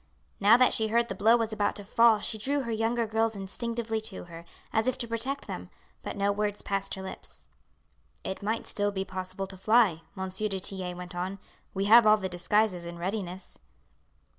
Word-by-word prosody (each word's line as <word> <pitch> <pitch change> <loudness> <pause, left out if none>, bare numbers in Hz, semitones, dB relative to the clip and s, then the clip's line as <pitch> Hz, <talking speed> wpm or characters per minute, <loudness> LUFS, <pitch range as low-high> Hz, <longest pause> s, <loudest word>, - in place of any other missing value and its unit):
Now 210 +4 +7
that 255 0 +4
she 220 - +2
heard 235 +2 +1
the - - -2
blow 220 +5 +4
was 225 -1 -2
about 205 -1 0
to 205 - -7
fall 225 +1 +4
she 220 - -2
drew 280 +6 0
her 235 -3 -4
younger 225 +1 0
girls 220 0 0
instinctively 225 +3 -3
to 215 -3 -5
her, 170 -1 -11 0.3
as 220 +2 +2
if 255 - +1
to 235 - -2
protect 250 +5 -3
them, - - -7 0.3
but - - -6
no 200 0 +2
word 205 0 -1
passed 195 0 -1
her 190 - -7
lips. 190 - -10 0.8
"It 190 - -5
might 220 +3 -2
still 205 0 0
be 190 -1 -3
possible 185 +1 -5
to 190 0 -9
fly," 210 -5 +3 0.2
M. 190 0 -3
du 195 +1 -2
Tillet 180 -1 -2
went 180 0 -7
on. 185 +2 -3 0.4
"We 195 +1 0
have 225 +2 +7
all 215 0 +7
the 190 -2 -4
disguises 185 +1 +1
in 170 0 -7
readiness." 185 0 -5
205 Hz, 200 wpm, -28 LUFS, 190-225 Hz, 0.8 s, Now